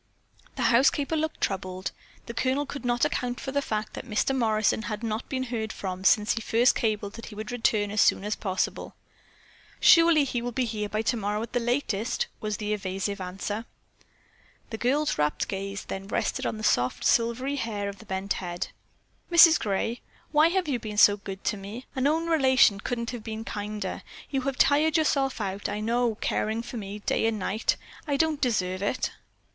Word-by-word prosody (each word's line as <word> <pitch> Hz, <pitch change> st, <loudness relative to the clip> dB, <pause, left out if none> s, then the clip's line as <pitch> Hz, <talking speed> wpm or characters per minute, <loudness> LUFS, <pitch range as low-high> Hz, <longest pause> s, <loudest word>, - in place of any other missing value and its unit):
The -, -, -2 dB
housekeeper 280 Hz, +5 st, +3 dB
looked 315 Hz, 0 st, -2 dB
troubled. 185 Hz, -2 st, -2 dB, 0.3 s
The 235 Hz, -, -6 dB
Colonel 265 Hz, +4 st, 0 dB
could 280 Hz, 0 st, -7 dB
not 240 Hz, -1 st, +2 dB
account 245 Hz, 0 st, -2 dB
for 265 Hz, -, -5 dB
the 280 Hz, +1 st, +1 dB
fact 215 Hz, -5 st, -3 dB
that -, -, -6 dB
Mr. 220 Hz, +5 st, +1 dB
Morrison 220 Hz, -3 st, +2 dB
had 215 Hz, 0 st, -5 dB
not 225 Hz, +1 st, -3 dB
been 260 Hz, -1 st, -1 dB
heard 230 Hz, -3 st, -3 dB
from 185 Hz, -1 st, -5 dB
since 210 Hz, +2 st, +4 dB
he 225 Hz, -, -3 dB
first 235 Hz, +3 st, +3 dB
cabled 210 Hz, -3 st, -1 dB
that 230 Hz, -, -9 dB
he 210 Hz, -, -9 dB
would 215 Hz, +3 st, -6 dB
return 215 Hz, -4 st, +1 dB
as 210 Hz, 0 st, +2 dB
soon -, -, +4 dB
as 210 Hz, +1 st, -1 dB
possible. 190 Hz, -2 st, -2 dB, 0.8 s
"Surely 330 Hz, -3 st, +7 dB
he 245 Hz, -3 st, -2 dB
will 245 Hz, +1 st, -3 dB
be 250 Hz, +1 st, 0 dB
here 210 Hz, -2 st, -3 dB
tomorrow 215 Hz, -1 st, -1 dB
by 230 Hz, -, -6 dB
the 245 Hz, -, +1 dB
latest," 240 Hz, -3 st, -1 dB
was 215 Hz, -1 st, -3 dB
the 210 Hz, -1 st, -2 dB
evasive 195 Hz, 0 st, -3 dB
answer. 195 Hz, +4 st, -4 dB, 1.1 s
The 220 Hz, -, -5 dB
girl's 290 Hz, +5 st, +1 dB, 0.3 s
gaze 195 Hz, 0 st, -4 dB
then 195 Hz, 0 st, -6 dB
rested -, -, -1 dB
on -, -, -3 dB
the 215 Hz, -, -7 dB
soft, 125 Hz, -9 st, +1 dB
silvery 245 Hz, +4 st, +2 dB
hair 210 Hz, -5 st, -2 dB
of 200 Hz, 0 st, -6 dB
the 220 Hz, -, -14 dB
bent 190 Hz, +1 st, -1 dB
head. 175 Hz, -1 st, -4 dB, 0.6 s
"Mrs. 335 Hz, -2 st, +8 dB
Gray, 225 Hz, +3 st, -1 dB, 0.3 s
why 305 Hz, +1 st, +6 dB
have 365 Hz, +1 st, 0 dB
you 265 Hz, -4 st, 0 dB
been 215 Hz, -2 st, -6 dB
so 205 Hz, 0 st, +7 dB
good 195 Hz, -1 st, -8 dB
to 210 Hz, -, 0 dB
me? 205 Hz, +6 st, -8 dB
An 265 Hz, +1 st, +2 dB
own 320 Hz, +3 st, +1 dB
relation 260 Hz, -10 st, +4 dB
couldn't 235 Hz, +2 st, -3 dB
have 240 Hz, -3 st, -7 dB
been 220 Hz, 0 st, -5 dB
kinder. 210 Hz, -3 st, -4 dB, 0.3 s
You 270 Hz, -2 st, 0 dB
have 270 Hz, 0 st, -2 dB
tired 305 Hz, +3 st, +4 dB
yourself 275 Hz, -5 st, +1 dB
all 210 Hz, -, -1 dB
out, 195 Hz, +2 st, -4 dB
I 205 Hz, 0 st, -3 dB
know, 235 Hz, +1 st, +1 dB
caring 220 Hz, +2 st, -1 dB
for 240 Hz, 0 st, -7 dB
me 200 Hz, -1 st, -6 dB
day 225 Hz, -, +2 dB
and 225 Hz, -1 st, 0 dB
night. 210 Hz, +2 st, 0 dB, 0.3 s
I 285 Hz, -1 st, +1 dB
don't 315 Hz, -1 st, +1 dB
deserve 185 Hz, -7 st, 0 dB
it." 205 Hz, +5 st, -1 dB
225 Hz, 190 wpm, -27 LUFS, 205-260 Hz, 1.1 s, Mrs